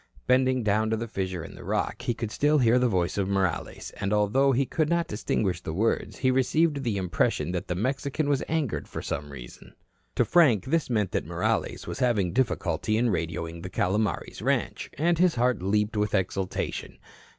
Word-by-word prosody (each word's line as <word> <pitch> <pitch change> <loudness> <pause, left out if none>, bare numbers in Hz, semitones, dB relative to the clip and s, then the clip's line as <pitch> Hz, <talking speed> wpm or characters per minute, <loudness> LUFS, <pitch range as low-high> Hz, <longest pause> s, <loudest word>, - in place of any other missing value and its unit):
Bending 130 -1 +3
down 110 +1 +2
to 110 - 0
the 115 +1 -4
fissure 95 -5 -3
in - - -9
the - - -11
rock, - - -2
he 120 - -1
could 115 -2 -4
still 150 +5 +2
hear 125 -2 +4
the 125 - +3
voice 90 -3 0
of 95 - 0
Morales, 95 -3 -2
and 100 - -1
although 105 +7 +3
he 135 +2 +2
could 155 +3 0
not 170 0 +2
distinguish 100 -4 -1
the 80 - -5
words, 115 +5 0
he 130 -1 +2
received 145 +3 +2
the 115 -5 -1
impression 90 -1 0
that 90 -1 -3
the 90 - -2
Mexican 135 - -1
was 140 -2 +1
angered 155 -7 -1
for - - -6
some 75 - -4
reason. - - -11 0.4
To - - +3
Frank 140 - +4
this 160 +2 0
meant 105 -6 0
that - - -2
Morales - - -1
was - - -5
having 110 -9 +1
difficulty 110 -5 0
in 120 +1 +2
radioing 85 -2 -3
the 90 - -6
Calomares 100 +1 -1
ranch, - - -1
and 170 +3 +2
his 180 -2 +4
heart 125 -4 +1
leaped 105 +3 0
with 105 -1 0
exultation. 95 0 -2
110 Hz, 195 wpm, -27 LUFS, 95-130 Hz, 0.4 s, hear